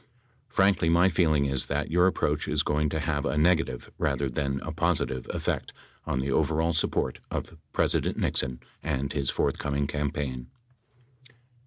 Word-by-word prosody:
Frankly, 95 -4 +3
my 85 +3 +5
feeling 75 -6 +2
is 65 -2 +1
that 75 +3 -2
your 90 +2 +5
approach 95 - 0
is - - +1
going 75 0 +1
to 80 - -2
have 75 -2 -1
a 75 - -1
negative, 80 +1 +1
rather 70 -2 0
than 70 +1 -1
a 80 - -5
positive, 80 -6 0
effect - - -2 0.3
on - - 0
the 65 +1 -1
overall 80 +4 +2
support 80 - +1
of - - -4 0.2
President - - +1
Nixon 65 -2 0 0.2
and 70 -3 -2
his 70 -3 0
forthcoming 70 0 0
campaign. 70 -3 -3
75 Hz, 150 wpm, -27 LUFS, 70-80 Hz, 0.3 s, my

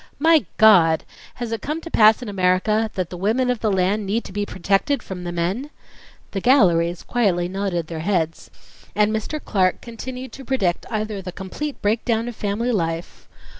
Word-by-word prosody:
My 320 +1 +4
God, 175 -8 +6 0.3
has 240 -2 -5
it 225 - -3
come 305 +3 -3
to 335 - -9
pass 220 +2 +5
in - - -7
America 200 +3 +1
that 185 -3 -3
the 180 - -6
women 230 +7 +1
of 245 - -2
the 215 -1 0
land 195 +3 +1
need 205 +4 -1
to - - -10
be 205 0 -2
protected 200 +8 0
from 180 -2 -7
the 175 - -3
men?" 185 +11 -2 0.6
The 195 - -3
galleries 175 - +3
quietly 190 -8 +1
nodded 185 -3 -2
their 160 0 -6
heads, 165 -2 -1 0.5
and 210 +1 +3
Mr. 220 +8 -3
Clark 185 -9 +1
continued 250 +2 -7
to 270 - -10
predict 215 -10 -1
either 215 -2 -3
the 180 -1 -6
complete 195 +11 -6
breakdown 225 +2 +1
of 240 - -6
family 215 +5 -1
life 165 -5 -3
205 Hz, 180 wpm, -22 LUFS, 180-235 Hz, 0.6 s, God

